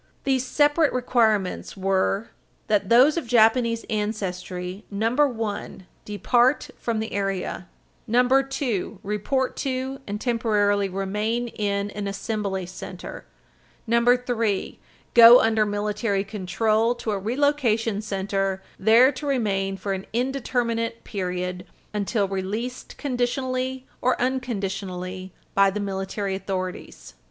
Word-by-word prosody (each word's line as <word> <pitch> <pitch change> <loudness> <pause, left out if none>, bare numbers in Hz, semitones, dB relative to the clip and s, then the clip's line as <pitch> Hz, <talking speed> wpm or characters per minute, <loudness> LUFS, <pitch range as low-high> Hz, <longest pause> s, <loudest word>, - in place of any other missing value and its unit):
These 265 -2 +1
separate 295 +3 +3
requirements 225 -7 +1
were 195 +2 0 0.4
that 205 -2 +1
those 260 +7 +6
of 325 - -3
Japanese 230 0 +3
ancestry 190 -3 -3
(1) 225 -3 -1 0.2
depart 240 +6 +2
from 235 -2 -2
the 220 0 -3
area; 195 -2 -2 0.4
(2) 250 -4 +1
report 230 +6 -1
to 265 0 -3
and 205 +1 -3
temporarily 210 -4 +1
remain 210 +5 -2
in 205 -1 -2
an 205 -1 -4
assembly 200 -2 -3
center; 185 0 -9 0.6
(3) 235 -3 +1 0.3
go 235 +1 +10
under 220 -1 +2
military 205 0 -1
control 215 +4 0
to 230 -2 -3
a 200 - -1
relocation 230 -2 +1
center, 195 -2 -2 0.2
there 230 +6 +6
to 290 +2 -6
remain 195 -7 0
for 195 0 -3
an 190 0 -5
indeterminate 235 -2 -1
period 180 -2 -3 0.3
until 205 0 0
released 205 +6 -4
conditionally 255 0 -2 0.2
or 255 - +2
unconditionally 195 -7 -3 0.2
by 195 0 +5
the 200 +2 -3
military 195 0 -3
authorities. 185 -1 -5
215 Hz, 110 wpm, -24 LUFS, 195-245 Hz, 0.6 s, go